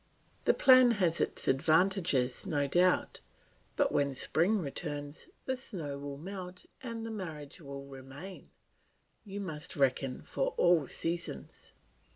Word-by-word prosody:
The - - +4
plan 255 -2 +7
has 175 -4 +2
its - - -1
advantages, 160 -2 +2
no 145 -5 +1
doubt; 180 +6 +2 0.6
but - - +2
when 140 -1 +1
spring 175 - +3
returns, 145 -3 -4 0.2
the 260 - -1
snow 165 - -4
will 140 0 -6
melt 185 +2 -8 0.2
and 230 -3 -5
the 225 - -5
marriage 165 -6 -7
will 140 -2 -8
remain; 135 +7 -10 0.7
you 200 -2 -7
must 165 -3 -5
reckon 135 -2 0
for - - -2
all 175 -5 +4
seasons. 170 +5 -4
165 Hz, 130 wpm, -31 LUFS, 140-195 Hz, 0.7 s, plan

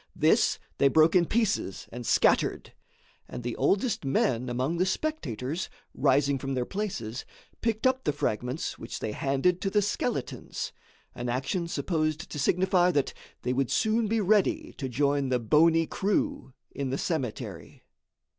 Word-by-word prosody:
This - - +3 0.2
they 140 - +6
broke 155 +5 +4
in 175 -2 +5
pieces 220 - 0
and 120 0 -6
scattered, - - +2 0.5
and 120 - -7
the 120 -1 -3
oldest 200 - +1
men 130 -2 +1
among 130 +7 -1
the 180 - +2
spectators, 165 - -2 0.2
rising 140 0 +2
from 135 +1 -3
their 125 -1 0
places, 135 - -4 0.4
picked 225 0 -1
up 260 0 +2
the - - +1
fragments 125 0 -2
which 115 - -6
they 110 - -3
handed 140 +10 +1
to 195 - 0
the 205 +1 +2
skeletons 205 - -3 0.4
an 120 0 -4
action 135 +8 -1
supposed 155 -2 -1
to 150 - -4
signify 180 +4 +3
that 145 -6 0 0.3
they 125 - 0
would 135 -1 0
soon 220 0 +2
be 225 +2 +1
ready 215 - +2
to 135 - -3
join 140 +2 +1
the 125 - +2
bony 165 +8 +4
crew 275 - -1 0.2
in 140 -2 -3
the 135 - -1
cemetery. 125 - -4
150 Hz, 155 wpm, -28 LUFS, 130-195 Hz, 0.5 s, they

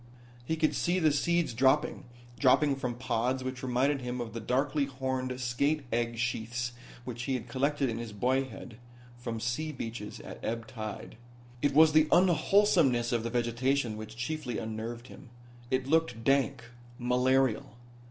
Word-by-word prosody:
He 160 +6 -1
could 155 -1 +1
see 175 +2 +1
the 160 -4 +4
seeds 170 +1 +1
dropping 135 +5 +2 0.3
dropping 140 +2 +4
from 125 -3 -3
pods 125 +1 -1
which 130 0 -4
reminded 130 +2 +1
him 125 0 -4
of 115 -3 -5
the 115 - -4
darkly 135 +5 0
horned 130 -1 -3
skate 140 +5 0
egg 115 0 0
sheaths 120 +1 -2 0.3
which 120 -1 -5
he 135 - 0
had 125 -2 -5
collected 140 +3 0
in 115 -1 -3
his 115 -2 -6
boyhood 125 +1 -2 0.4
from 120 -2 -5
sea 120 +8 -2
beaches 115 -6 -6
at - - -10
ebb 115 0 -2
tide. 110 -2 -7 0.4
It 145 -1 +1
was 160 +1 +7
the 155 0 +5
unwholesomeness 175 - +4
of 120 -2 +1
the 115 - -3
vegetation 120 +1 0
which 110 +1 -8
chiefly 125 0 -3
unnerved 115 +1 -5
him. 130 0 -13 0.4
It 130 0 0
looked 160 -6 +1
dank, 135 -2 +2 0.3
malarial. 125 -2 +1
125 Hz, 155 wpm, -30 LUFS, 120-140 Hz, 0.4 s, was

